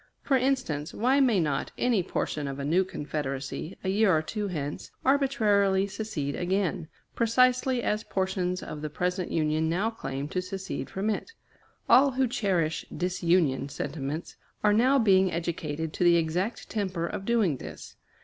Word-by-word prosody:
For 275 - +2
instance, 250 - 0
why 255 +6 +3
may 245 -8 +4
not 145 -4 -1
any 240 -6 +2
portion 150 -3 -2
of 135 0 -4
a 140 - -4
new 175 +6 +3
Confederacy, 145 -1 -4
a 190 - -1
year 205 +1 +3
or 155 - -1
two 210 +5 -3
hence, 150 -5 -4 0.2
arbitrarily 210 -8 +3
secede 190 -9 -4
again, 180 -2 -1 0.3
precisely 255 +2 +2
as 210 +1 0
portions 185 -1 -1
of 150 - -7
the 155 - -3
present 180 +3 -2
Union 155 0 +1
now 195 +7 0
claim 140 -10 -5
to 185 - -1
secede 190 +1 -5
from 200 +3 -1
it? 455 - -4 0.5
All 265 +3 +6
who 260 0 +2
cherish 185 -9 0
disunion 170 -5 +1
sentiments 145 +2 -5 0.3
are 210 -1 +5
now 255 +6 +4
being 190 -6 +4
educated 160 -2 -3
to - - -1
the 175 -1 +6
exact 175 +7 -1
temper 190 -6 -2
of 180 - -4
doing 205 - +2
this. - - -10
185 Hz, 160 wpm, -28 LUFS, 155-220 Hz, 0.5 s, All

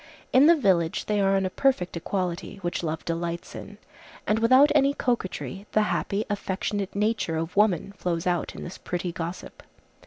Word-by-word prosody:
In 270 +3 +7
the 340 - +7
village 185 - +1
they 210 -1 +1
are 195 0 +3
on 195 -1 +1
a 185 - -2
perfect 255 -11 +1
equality, 175 0 -3
which 175 +1 -2
love 160 -1 -4
delights 170 0 -3
in, 205 - -9 0.5
and 215 +1 +1
without 255 +6 +6
any 285 -1 +3
coquetry 205 -4 -3
the 215 - +4
happy, 205 +1 -1
affectionate 200 -1 -3
nature 210 -5 0
of 165 +1 -4
woman 200 -2 +2
flows 170 -4 -2
out 175 -2 -1
in - - -7
this 175 - -8
pretty 175 0 -3
gossip. 170 +1 -6
195 Hz, 175 wpm, -26 LUFS, 175-215 Hz, 0.5 s, In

